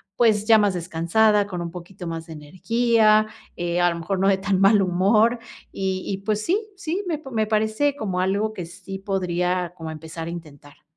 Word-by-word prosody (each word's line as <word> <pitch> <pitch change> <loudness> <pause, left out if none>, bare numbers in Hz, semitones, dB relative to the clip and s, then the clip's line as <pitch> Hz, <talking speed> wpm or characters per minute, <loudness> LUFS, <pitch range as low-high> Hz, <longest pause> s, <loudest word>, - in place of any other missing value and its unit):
pues, 215 -3 +3
ya 225 -1 +7
más 205 -2 +2
descansada, 180 +5 +2
con 180 -3 -5
un 170 - -4
poquito 180 +1 -9
más 165 0 -5
de 160 - -9
energía, 215 +7 +2 0.3
eh, 175 0 -1
a 175 - +4
lo 170 - -5
mejor 185 +3 -2
no 195 - +2
de 195 -1 +4
tan 195 -1 0
mal 200 +1 +5
humor, 205 +6 +3 0.3
y 190 -1 -2
y 195 - -2
pues 215 0 0
sí, 370 - +2 0.2
sí, 370 +1 -3
me 310 -3 -2
me 220 -2 +1
parece 220 +7 +1
como 190 -8 -3
algo 200 +4 0
que 180 -5 -6
sí 190 +3 -9
podría 180 -2 -1
como 160 -2 -6
empezar 160 +1 -7
a 170 - -4
intentar. 145 -4 -11
195 Hz, 195 wpm, -23 LUFS, 175-215 Hz, 0.3 s, ya